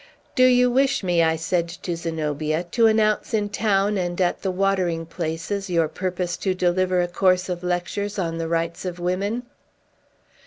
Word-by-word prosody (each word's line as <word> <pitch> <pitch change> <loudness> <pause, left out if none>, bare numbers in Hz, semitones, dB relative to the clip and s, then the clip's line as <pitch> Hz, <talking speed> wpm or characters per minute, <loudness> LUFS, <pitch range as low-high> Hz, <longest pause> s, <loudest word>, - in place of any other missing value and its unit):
"Do 255 -2 +5
you 250 -1 +5
wish 275 -1 +2
me," 175 -2 +2
I 160 0 +3
said 170 +1 -1
to 175 0 -5
Zenobia, 155 -1 -2
"to 230 -2 +4
announce 215 0 +2
in 205 -1 0
town, 205 -1 +1
and 175 0 -3
at 180 -2 +1
the 195 - -1
watering 185 -3 0
places, 165 +4 -4
your 165 -2 +2
purpose 180 +1 -3
to 190 -2 -1
deliver 180 0 +2
a - - -1
course 185 +1 +2
of 175 -1 -3
lectures 180 +4 -2
on 165 -3 -2
the 165 - -2
rights 165 0 -2
of 180 -2 -4
women?" 195 +7 -1
180 Hz, 170 wpm, -23 LUFS, 170-200 Hz, -, Do